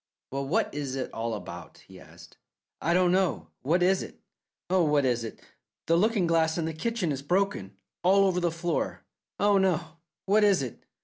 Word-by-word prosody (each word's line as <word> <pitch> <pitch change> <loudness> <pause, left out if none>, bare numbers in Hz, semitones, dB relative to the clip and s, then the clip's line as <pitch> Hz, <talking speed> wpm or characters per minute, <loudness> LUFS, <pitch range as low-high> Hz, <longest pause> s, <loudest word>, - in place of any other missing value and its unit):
"Well, 135 +1 -3
what 220 +10 0
is 140 -2 -3
it 135 - -4
all 115 0 -2
about?" 90 -4 -9
he - - -13
asked. - - -15 0.5
"I 170 - +1
don't 180 -1 +4
know. 180 - 0
What 170 +7 +2
is 190 +1 +3
it? - - -9 0.5
Oh, 185 -1 +3
what 150 -3 +2
is 120 -2 +1
it? 115 - -7 0.5
The 165 - +3
looking 205 +1 +2
glass 165 -1 +2
in 165 - -1
the 160 - -3
kitchen 200 0 -2
is 135 -1 -3
broken. 145 - -1 0.2
All 195 +2 +5
over 185 -2 +1
the 175 -1 +1
floor. 165 0 -2 0.4
Oh, 200 0 +4
oh! 170 -3 -1 0.3
What 210 +2 +4
is 200 -8 +4
it?" 125 - -8
170 Hz, 190 wpm, -27 LUFS, 140-190 Hz, 0.5 s, All